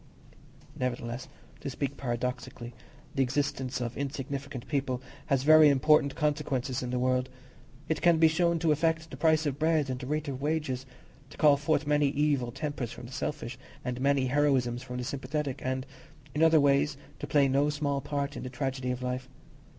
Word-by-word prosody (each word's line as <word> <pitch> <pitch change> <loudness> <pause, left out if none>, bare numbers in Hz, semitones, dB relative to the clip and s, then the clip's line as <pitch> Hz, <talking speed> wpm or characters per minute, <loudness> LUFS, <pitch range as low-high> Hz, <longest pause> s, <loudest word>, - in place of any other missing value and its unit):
Nevertheless, 120 0 -3 0.3
to 145 - -5
speak 140 +1 -3
paradoxically, 125 -1 -4 0.4
the 135 - +1
existence 135 0 -1
of 120 -1 -3
insignificant 140 -2 -4
people 135 -4 -1 0.3
has 135 -3 +2
very 155 0 +8
important 140 0 +4
consequences 140 -4 -1
in 125 - -4
the 125 - -1
world. 130 0 +1 0.6
It 160 - -1
can 170 -2 +5
be 160 0 +6
shown 170 +1 +2
to 165 -1 +2
affect 160 +1 +1
the - - -6
price 155 +1 +3
of 140 -1 -2
bread 155 -3 +2
and 125 - -3
the 125 - -6
rate 155 +1 -1
of 135 -1 -4
wages, 145 -4 -1 0.4
to - - -14
call 150 -2 +6
forth 145 +1 0
many 150 0 +3
evil 140 -3 +1
tempers 135 -3 -4
from 125 - -9
the 120 - -10
selfish 140 -3 -4 0.3
and 125 0 -3
many 140 -1 +3
heroisms 130 -4 +2
from 125 -1 -6
the 125 - -3
sympathetic, 140 +2 -3
and, 130 0 -2 0.5
in 150 - -1
other 160 -1 +6
ways, 140 0 +3 0.2
to - - -5
play 145 -2 +4
no 140 +2 +2
small 145 -1 -1
part 145 0 -3
in - - -5
the 130 - -5
tragedy 130 0 -3
of 125 0 -3
life. 125 0 -3
140 Hz, 180 wpm, -29 LUFS, 130-150 Hz, 0.6 s, very